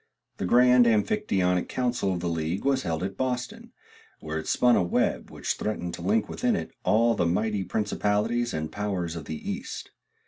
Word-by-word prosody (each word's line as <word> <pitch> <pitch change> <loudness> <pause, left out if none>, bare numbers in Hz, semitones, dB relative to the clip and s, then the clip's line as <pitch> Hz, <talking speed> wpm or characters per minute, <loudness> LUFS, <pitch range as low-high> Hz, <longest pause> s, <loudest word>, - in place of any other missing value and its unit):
The 95 - -2
grand 125 +2 +6
Amphictyonic 105 - +1
council 120 -6 0
of 90 -2 -2
the 90 - -2
league 85 +4 -2
was 135 -1 +2
held 80 0 -2
at 95 0 -3
Boston, 125 -1 -3 0.5
where 80 0 -4
it 80 - -7
spun 125 -1 +4
a - - +3
web 85 - 0
which - - -2
threatened 90 -5 -3
to 85 - -7
link 105 +5 +1
within 245 -3 0
it - - -4
all 115 +2 +4
the 85 - +1
mighty 105 +3 0
principalities 105 +4 0
and 80 0 -3
powers 95 -5 -3
of 80 -3 -6
the 80 - -5
east. - - -5
105 Hz, 180 wpm, -27 LUFS, 85-120 Hz, 0.5 s, grand